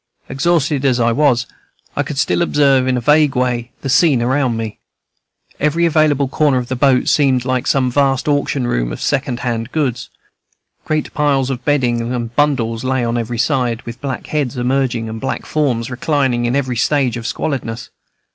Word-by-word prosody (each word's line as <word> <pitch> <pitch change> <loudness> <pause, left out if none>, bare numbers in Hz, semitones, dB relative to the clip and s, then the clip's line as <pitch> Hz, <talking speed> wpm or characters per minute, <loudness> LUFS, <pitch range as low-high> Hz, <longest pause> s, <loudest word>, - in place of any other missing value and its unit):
Exhausted 150 -1 0
as 130 -3 +2
I 115 0 +2
was, 125 -2 +2 0.5
I - - +1
could 150 - -5
still 140 - +1
observe, 140 -5 +3
in 130 -1 +1
a - - -2
vague 150 +1 +3
way, 125 -1 -1
the - - -4
scene 135 +1 +4
around 130 -1 +1
me. 110 -2 -5 0.8
Every 155 +3 +1
available 150 -3 +2
corner 145 0 +1
of 125 -1 -3
the 130 - -1
boat 130 0 +2
seemed 130 -4 +2
like 130 -1 -1
some 130 -2 +2
vast 135 0 +1
auction 145 -3 0
room - - -1
of - - -6
second 130 -3 -1
hand 120 -1 -3
goods. 140 -6 -2 0.8
Great 155 -1 -2
piles 140 -3 +1
of 125 -1 -5
bedding 120 -5 +1
and 120 -1 -5
bundles 125 -6 +1
lay 130 -1 0
on 115 0 -1
every 120 0 -3
side, 125 -2 0
with 115 0 -9
black 135 -3 -4
heads 145 -4 -2
emerging 125 -2 0
and 110 0 -6
black 135 - -3
forms 130 -6 -1
reclining 130 -2 0
in 120 +2 0
every 130 -3 -1
stage 135 -1 +1
of 115 0 -5
squalidness. 120 -5 -4
130 Hz, 180 wpm, -17 LUFS, 120-145 Hz, 0.8 s, scene